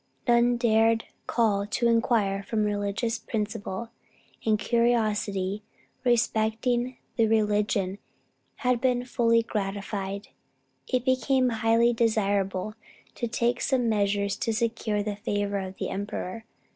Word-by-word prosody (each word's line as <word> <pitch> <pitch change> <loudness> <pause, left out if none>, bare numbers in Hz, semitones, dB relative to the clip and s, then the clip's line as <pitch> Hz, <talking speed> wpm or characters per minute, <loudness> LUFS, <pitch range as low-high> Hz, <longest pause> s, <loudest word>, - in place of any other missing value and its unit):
None 240 0 +4
dared 225 -1 +3 0.2
call 205 -4 +1
to 235 +3 +1
inquire 225 -4 +2
from 215 +2 -1
religious 210 +2 -1
principle, 215 0 -4 0.5
and 215 -1 +3
curiosity 210 -4 +1 0.4
respecting 240 +1 +1 0.2
the 225 -2 +4
religion 210 -3 +1 0.7
had 250 -2 +2
been 250 -1 +1
fully 230 -2 +2
gratified. 200 -1 -4 0.6
It 255 -1 0
became 260 0 +2
highly 230 +1 +3
desirable 205 -3 0 0.4
to 240 - -3
take 235 +1 0
some 250 -4 +1
measures 200 -1 +1
to 225 - -1
secure 220 -2 -1
the 205 -1 -3
favor 205 -2 -1
of 190 0 -6
the - - -3
emperor. 205 +2 -4
220 Hz, 115 wpm, -27 LUFS, 205-235 Hz, 0.7 s, None